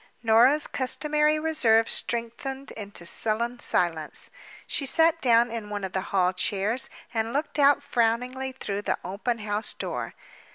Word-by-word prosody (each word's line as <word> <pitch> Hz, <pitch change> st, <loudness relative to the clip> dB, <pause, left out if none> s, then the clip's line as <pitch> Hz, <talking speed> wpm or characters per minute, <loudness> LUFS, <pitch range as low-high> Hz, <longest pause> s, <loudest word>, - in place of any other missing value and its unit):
Norah's 240 Hz, +7 st, +4 dB
customary 300 Hz, +3 st, +1 dB
reserve 240 Hz, -8 st, +3 dB
strengthened 240 Hz, +4 st, -3 dB
into 200 Hz, -5 st, -7 dB
sullen 235 Hz, +6 st, 0 dB
silence—she 175 Hz, -, -1 dB
sat 325 Hz, +3 st, +4 dB
down 235 Hz, -1 st, +4 dB
in 225 Hz, -3 st, -6 dB
one 205 Hz, -1 st, -4 dB
of 190 Hz, -, -4 dB
the 190 Hz, -, -1 dB
hall 185 Hz, -1 st, +2 dB
chairs 205 Hz, +6 st, 0 dB, 0.2 s
and 225 Hz, 0 st, -1 dB
looked 290 Hz, +1 st, -2 dB
out 285 Hz, 0 st, +4 dB
frowningly 250 Hz, 0 st, -1 dB
through 205 Hz, -6 st, -5 dB
the -, -, -1 dB
open 210 Hz, +6 st, -3 dB
house 210 Hz, 0 st, -2 dB
door. -, -, -5 dB
235 Hz, 135 wpm, -26 LUFS, 210-275 Hz, 0.2 s, Norah's